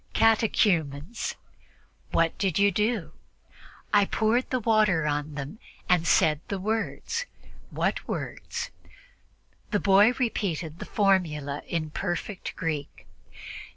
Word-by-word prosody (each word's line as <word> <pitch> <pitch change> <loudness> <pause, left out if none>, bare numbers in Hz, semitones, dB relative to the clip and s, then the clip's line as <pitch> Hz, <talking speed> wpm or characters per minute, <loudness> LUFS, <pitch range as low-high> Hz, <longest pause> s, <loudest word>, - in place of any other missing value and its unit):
"Catechumens." 205 -6 +2 0.8
"What 165 0 +2
did 190 -5 +1
you 200 0 +5
do?" 210 0 0 0.8
"I 205 -1 +6
poured 225 +5 +1
the 255 - 0
water 215 -8 +3
on 150 0 -2
them 145 +9 -6 0.3
and 175 -2 +3
said 155 -2 +4
the 200 - -2
words." 225 - -2 0.4
"What - - -1
words?" - - -4 1.0
The 205 - +1
boy 200 +4 +5
repeated 180 - -2
the - - -5
formula 160 -8 +1
in 155 -3 -2
perfect 185 +3 -4
Greek. 155 -4 -4
195 Hz, 110 wpm, -27 LUFS, 155-215 Hz, 1.0 s, I